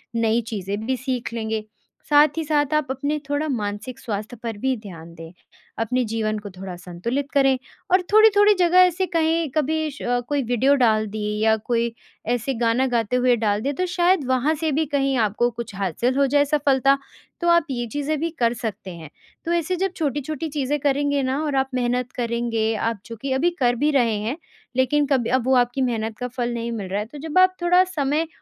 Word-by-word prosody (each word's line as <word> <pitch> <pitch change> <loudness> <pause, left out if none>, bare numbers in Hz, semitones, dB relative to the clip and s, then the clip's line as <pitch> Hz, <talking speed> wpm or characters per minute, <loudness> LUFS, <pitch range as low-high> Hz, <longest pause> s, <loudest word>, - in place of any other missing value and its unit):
नई 230 0 +2
चीज़ें 200 -2 -3
भी 260 0 0
सीख 255 -3 -3
लेंगे। 220 -1 -3 0.4
साथ 295 +1 +5
ही 325 - 0
साथ 295 -1 +1
आप 305 -3 +1
अपने 285 +3 -2
थोड़ा 290 +2 0
मानसिक 215 +1 -4
स्वास्थ्य 215 0 -5
पर 225 -3 -4
भी 265 +4 0
ध्यान 170 -6 -11
दें। 165 0 -10 0.5
अपने 250 +3 0
जीवन 215 -1 -1
को 205 -1 -8
थोड़ा 185 -1 -8
संतुलित 185 +11 -4
करें 270 -2 +3 0.3
और 370 +1 +5
थोड़ी-थोड़ी 420 -1 +6
जगह 355 0 +4
ऐसे 365 +1 +4
कहीं 325 -1 +2
कभी 315 +1 0
श 285 - -13 0.3
कोई 290 -1 +1
वीडियो 245 +4 +3
डाल 220 -5 +2
दिए, 210 0 -3
या 220 0 +4
कोई 235 +1 -1 0.3
ऐसे 245 +3 0
गाना 235 +2 +1
गाते 235 -1 0
हुए 250 -1 +3
डाल 210 -2 0
दिया 280 +3 -1
तो 365 +6 -1
शायद 355 -2 +2
वहाँ 260 +4 +2
से 315 0 -1
भी 310 +3 +1
कहीं 275 -2 0
आपको 230 +2 +1
कुछ 235 -3 -7
हासिल 200 - -1
हो 280 - +4
जाए 285 +1 +3
सफलता। 275 -2 +3 0.4
तो 345 - 0
आप 340 -2 +4
ये 240 -2 -2
चीज़ें 290 +4 -2
भी 330 - -1
कर 235 -1 +2
सकते 215 -5 -5
हैं। 160 -3 -10 0.4
तो 335 - -1
ऐसे 345 +1 0
जब 380 +1 -1
छोटी-छोटी 295 +1 -2
चीज़ें 290 0 -1
करेंगे 285 0 +1
ना 265 +3 -1
और 290 -3 -1
आप 265 0 +1
मेहनत 250 0 -1
करेंगे 235 -2 -1
आप 225 -1 -2
जो 230 - -8
कि 275 -1 -3
अभी 315 +7 +2
कर 245 -1 +3
भी 295 +5 +1
रहे 240 -6 +2
हैं। 230 +9 -3 0.4
लेकिन 275 +3 +2
कभी 260 -5 +1
अब 255 -1 +1
वो 260 - +4
आपकी 245 +2 +2
मेहनत 225 -3 -1
का 250 - -3
फल 240 -1 -3
नहीं 235 0 -3
मिल 205 -5 -4
रहा 200 +2 -1
है। 210 - -3
तो 270 +6 -12
जब 320 +4 -4
आप 370 0 +5
थोड़ा 360 +1 +5
समय 310 -3 -1
255 Hz, 205 wpm, -23 LUFS, 225-295 Hz, 0.5 s, थोड़ी-थोड़ी